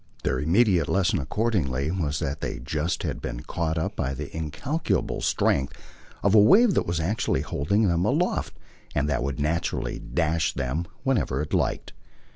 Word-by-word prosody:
Their 65 - 0
immediate 90 - +3
lesson 100 0 +2
accordingly 75 - 0
was 75 -6 -1
that 70 0 -3
they - - -3
just 75 +6 -2
had - - -3
been - - -5
caught 80 +3 -2
up 80 - -2
by 70 +1 -2
the 75 +2 -7
incalculable 95 - -2
strength 70 -1 +1 0.5
of 100 - +3
a 110 - +8
wave 195 - +6
that - - +1
was 85 -1 -1
actually 80 -5 0
holding 100 +9 +1
them 85 -1 +1
aloft 150 - 0 0.4
and 75 0 +1
that 70 -4 0
would 70 0 -3
naturally 80 +3 -1
dash 80 -2 0
them 70 +5 -2 0.2
wherever 120 - +1
it 75 - -7
liked. - - -1
80 Hz, 165 wpm, -26 LUFS, 70-100 Hz, 0.5 s, a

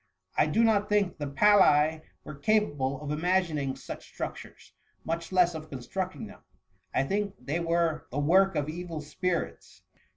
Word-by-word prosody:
I - - +3
do 225 +10 +2
not 215 -3 +2
think 205 -5 +1
the 145 - -3
Falli 155 -1 +4 0.2
were 150 - -8
capable 145 -5 0
of 145 - -4
ima^ning 155 -4 0
such - - -10
struc - - -2
tures, - - -14 0.3
much 165 +1 -3
less 180 -2 +4
of 155 -1 -8
constructing 185 - -5
them. 210 -1 -13 0.5
I - - +1
think 200 +6 -2
they 150 +5 -2
were 165 -2 0
the 130 - -6
work 190 +7 +4
of 145 -1 0
evil 165 0 -5
spirits.'" 170 +4 -4
165 Hz, 160 wpm, -28 LUFS, 150-190 Hz, 0.5 s, Falli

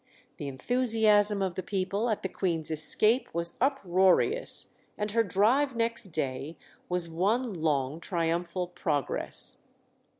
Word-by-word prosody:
The 145 - -5
enthusiasm 210 - +2
of 185 -2 -1
the 185 - -4
people 195 +4 -2
at 215 - -2
the - - 0
Queen's 165 -5 -2
escape 215 - +3
was 170 0 +1
uproarious, 255 - +2 0.3
and 210 0 -2
her 230 +2 +3
drive 240 +8 +2
next 230 0 0
day 155 -3 -4 0.3
was 180 -1 0
one 205 +8 0
long 150 -3 -1
triumphal 170 +1 -2
progress. 155 -5 -2
190 Hz, 125 wpm, -28 LUFS, 165-220 Hz, 0.3 s, escape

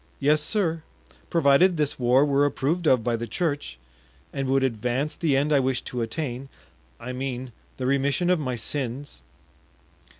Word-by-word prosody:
"Yes, 150 +2 +3
sir, 165 -1 0 0.5
provided 165 +3 +4
this 150 -3 0
war 125 +3 +4
were 140 -1 +2
approved 145 +4 0
of 125 -5 +4
by 120 0 0
the 115 +1 -4
church 145 - -2 0.6
and 135 -1 -2
would 135 0 +2
advance 130 +5 -1
the 155 -7 +1
end 150 +2 +1
I 140 - +5
wish 130 -1 -1
to 125 - -4
attain—I 120 - -7
mean, 130 -1 -4 0.3
the 130 - -3
remission 140 +6 +1
of 180 - +2
my 130 -4 -2
sins." 130 - -4
135 Hz, 155 wpm, -25 LUFS, 125-150 Hz, 0.6 s, I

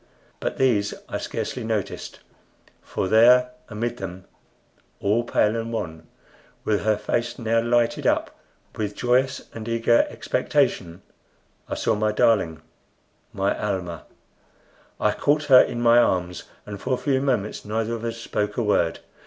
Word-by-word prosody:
But - - -3
these 105 -6 +2
I - - -4
scarcely 125 - -4
noticed; 110 -3 -4 0.6
for 95 - -3
there 125 +4 +6 0.2
amid 120 +2 -3
them, 95 -2 -7 0.7
all 105 +4 +1
pale 110 -2 +1
and 115 0 -3
wan, 80 -7 -5 0.6
with 105 -1 +1
her 110 -1 +2
face 120 +3 -2
now 115 0 +1
lighted 120 0 +1
up - - 0 0.4
with 105 -2 -3
joyous 125 +2 +1
and 110 0 -7
eager 115 0 +3
expectation, 85 +1 -1 0.7
I - - -2
saw 115 - +1
my 105 0 +1
darling 100 -9 +2 0.7
my 100 0 0
Almah! 90 -5 -4 0.9
I - - +2
caught 150 +1 +1
her 130 -3 +8
in 120 - -2
my 120 0 +6
arms, 90 -5 0 0.2
and 100 -2 -8
for 130 0 0
a - - -6
few 135 -1 0
moments 120 -7 -1
neither 110 +2 -2
of 115 -1 -5
us 115 0 -3
spoke 105 -2 -3
a 120 - +1
word. 85 -6 +1
110 Hz, 145 wpm, -24 LUFS, 100-120 Hz, 0.9 s, her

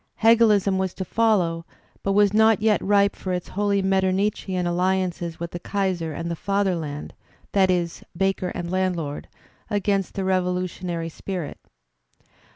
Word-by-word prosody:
Hegelism 215 -4 +4
was 190 -1 -2
to 190 - -4
follow 180 -6 +1 0.4
but 195 - 0
was 205 0 +4
not 220 0 +5
yet 215 -1 +2
ripe 200 0 +3
for 185 - -4
its 180 -1 -4
holy 200 0 0
Mettemichian 190 -1 0
aUiances 175 -1 -1
with 170 0 -5
the 175 - -5
Kaiser 185 -4 -1
and 165 +3 -4
the - - -2
Fatherland 175 -7 -2 0.4
(that 190 -2 +3
is, 175 -2 -1
banker 190 0 0
and 175 -1 -4
landlord) 180 -6 -2 0.4
against 200 -2 0
the 195 - -2
revolutionary 180 -2 -1
spirit. 175 -1 -6
190 Hz, 140 wpm, -24 LUFS, 175-200 Hz, 0.4 s, not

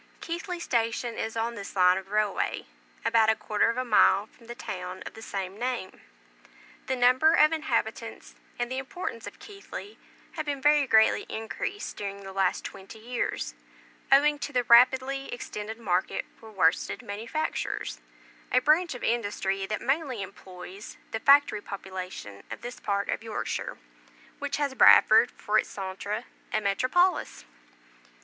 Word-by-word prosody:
Keighley 345 +2 -5
station 235 -4 -1
is 225 +1 -4
on 230 +1 -1
this 200 -3 -8
line 180 -1 +5
of 190 0 -6
railway, 210 -1 0 0.4
about 230 -1 +4
a 220 - +4
quarter 215 +1 +1
of 230 - -2
a 255 - -1
mile 210 -3 +5
from 230 +1 -21
the 240 - -7
town 180 -4 -6
of - - -7
the 225 - -11
same 195 -2 -5
name. 245 -6 -3 0.9
The 260 - 0
number 255 +6 +5
of 305 +1 +6
inhabitants 320 -2 -2 0.2
and 240 +1 -2
the 260 - -1
importance 265 - -6
of 205 - -10
Keighley 410 0 -10 0.3
have 310 -2 -5
been 285 -1 -2
very 295 0 +4
greatly 220 -2 +4
increased 310 - -5
during 200 -1 -5
the 195 0 -8
last 190 -1 +1
twenty 195 +3 -9
years, 235 +2 -3 0.6
owing 290 +2 +5
to 290 - -4
the 250 -3 +1
rapidly 260 +3 +4
extended 220 -2 -6
market 185 -5 -1
for 225 - -14
worsted 185 -6 +1
manufactures, 225 +10 -3 0.5
a - - +3
branch 305 +4 +3
of 250 - -9
industry 200 -4 -1
that 215 0 -3
mainly 270 -5 -1
employs 190 +1 -10
the 225 - -2
factory 275 -4 +5
population 185 - -7
of - - -7
this 240 +1 -7
part 200 -1 -1
of - - -1
Yorkshire, 225 -1 -4 0.6
which 285 -1 -2
has 285 -2 -1
Bradford - - +7
for 215 0 0
its - - -2
centre 200 +3 -4 0.3
and 215 - 0
metropolis. 255 - +1
230 Hz, 155 wpm, -27 LUFS, 200-270 Hz, 0.9 s, Bradford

